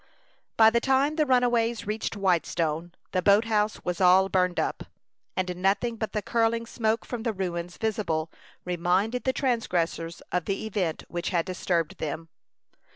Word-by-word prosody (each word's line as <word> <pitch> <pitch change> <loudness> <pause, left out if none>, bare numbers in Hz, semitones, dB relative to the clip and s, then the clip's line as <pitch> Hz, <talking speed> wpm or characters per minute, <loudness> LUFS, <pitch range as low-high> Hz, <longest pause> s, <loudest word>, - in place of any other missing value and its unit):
By 220 0 +7
the 235 0 +2
time 270 +3 +2
the 305 -2 +1
runaways 240 -2 +2
reached 215 +2 -3
Whitestone, 170 -3 0 0.2
the 185 - +1
boat 200 +4 +5
house 215 -1 0
was 180 +1 -2
all 185 +1 +6
burned 180 -2 +1
up, - - -2 0.5
and 180 -1 -1
nothing 200 +6 +1
but 220 -1 -4
the 210 - -2
curling 230 0 +1
smoke 225 -1 -1
from 245 -2 -5
the 230 -1 -1
ruins 175 -2 -4
visibly 200 -8 -1 0.4
reminded 180 +7 0
the 260 - +3
transgressors 175 -10 -1
of 180 -1 0
the 195 +2 -2
event 185 -7 -2
which 175 0 -3
had 170 -3 0
disturbed 180 -3 -1
them. 160 +2 -4
195 Hz, 155 wpm, -27 LUFS, 175-230 Hz, 0.5 s, By